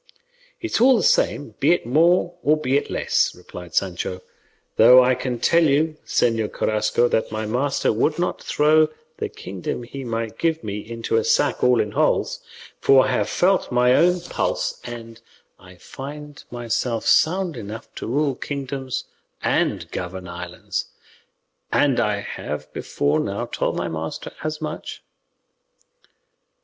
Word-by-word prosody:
"It 340 - -5
is - - +1
all 255 0 +6
the 205 - 0
same, 130 -8 +2
be 155 +5 +4
it 175 - -2
more 170 +7 +3
or 155 0 +3
be 135 -3 0
it 145 - 0
less," - - +1
replied 90 -2 -11
Sancho; 90 -1 -1 0.5
"though 125 +3 +8
I 130 +1 +3
can 125 -1 -3
tell 170 +8 +3
Señor 140 -7 +1
Carrasco 110 +2 +1
that 110 - 0
my 110 0 -3
master 125 +3 0
would 150 +8 +1
not 175 +1 -1
throw 155 +1 +3 0.3
the - - -3
kingdom 95 +5 -6
he 135 +3 -7
might 115 -2 -4
give 165 -1 0
me 105 -1 -4
into 115 - -2
a 455 - +2
sack 460 +1 +1
all - - +4
in - - 0
holes; - - +1 0.4
for 135 -1 +5
I - - 0
have 105 0 0
felt 185 -2 +2
my 125 0 +4
own 180 +4 +4
pulse 175 - -2
and 115 -1 -9 0.4
I 90 0 -15
find 145 +9 -9
myself 120 -1 -2
sound 180 0 +3
enough 110 -1 -8
to - - -5
rule 140 +4 +1
kingdoms 135 -1 -4 0.4
and - - 0
govern 90 +1 -5
islands; 85 0 -5 0.9
and 140 -4 +3
I 105 -3 0
have - - -6
before 70 +1 0
now - - -2
told - - -2
my - - -2
master 80 0 -5
as 155 0 -3
much." 155 - -6
125 Hz, 150 wpm, -22 LUFS, 110-155 Hz, 0.9 s, though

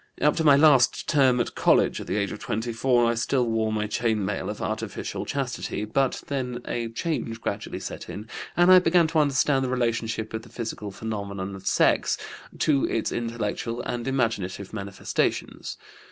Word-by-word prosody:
Up 150 - +3
to 165 - +1
my 145 -3 +7
last 140 -3 +5
term 130 -5 +4
at 120 - -1
college - - +3
at - - -8
the 95 - -1
age 100 -3 0
of - - -6
24 120 +1 +1
I - - +1
still 125 +2 +1
wore 110 -1 0
my 105 -1 0
chain 110 -1 0
mail 95 0 -2
of - - -5
artificial 100 0 -4
chastity; 125 -6 -3
but 130 +5 0
then 125 -3 -3
a 115 -1 -2
change 115 -2 -3
gradually - - -4
set - - -7
in, 105 +2 -7 0.3
and 175 +1 +6
I 185 - +10
began 175 -1 +4
to 160 - +2
understand 140 -1 +2
the 130 - -1
relationship 115 -3 -1
of 110 - -3
the - - -15
physical 110 -3 -5
phenomena 100 -2 -5
of 95 0 -10
sex - - +3 0.4
to 140 -3 +2
its 115 - -1
intellectual 115 0 -3
and 120 +1 -3
imaginative 110 -7 -1
manifestations. 100 -2 -2
115 Hz, 175 wpm, -26 LUFS, 110-135 Hz, 0.4 s, I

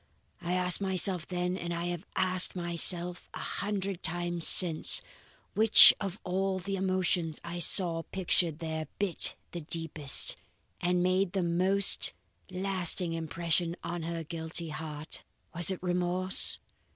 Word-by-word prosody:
I 175 0 -4
asked 180 +1 +1
myself 185 -2 0
then, 180 0 -4
and 175 -2 -7
I 170 0 -5
have 175 +1 -7
asked 185 0 +2
myself 175 0 -3
a - - -8 0.2
hundred 200 -2 -5
times 175 0 -1
since, 165 -4 +7 0.5
which 220 +1 +8
of 195 0 -6
all 190 +1 -3
the 195 +2 -6
emotions 185 -4 -2
I 170 +1 -8
saw 170 -1 +2
pictured 175 -3 -1
there 160 -2 -6
bit 200 -4 +2 0.2
the 175 - -8
deepest, 155 -3 +1 0.4
and 180 0 -1
made 185 0 -1
the 190 -2 -2
most 185 +3 +2 0.4
lasting 185 -2 -1
impression 165 +1 -3
on 175 0 -6
her 165 0 -6
guilty 160 +1 -6
heart? 155 0 -7 0.3
Was 170 +1 -1
it 190 - -4
remorse? 180 +1 -2
175 Hz, 135 wpm, -28 LUFS, 165-185 Hz, 0.5 s, which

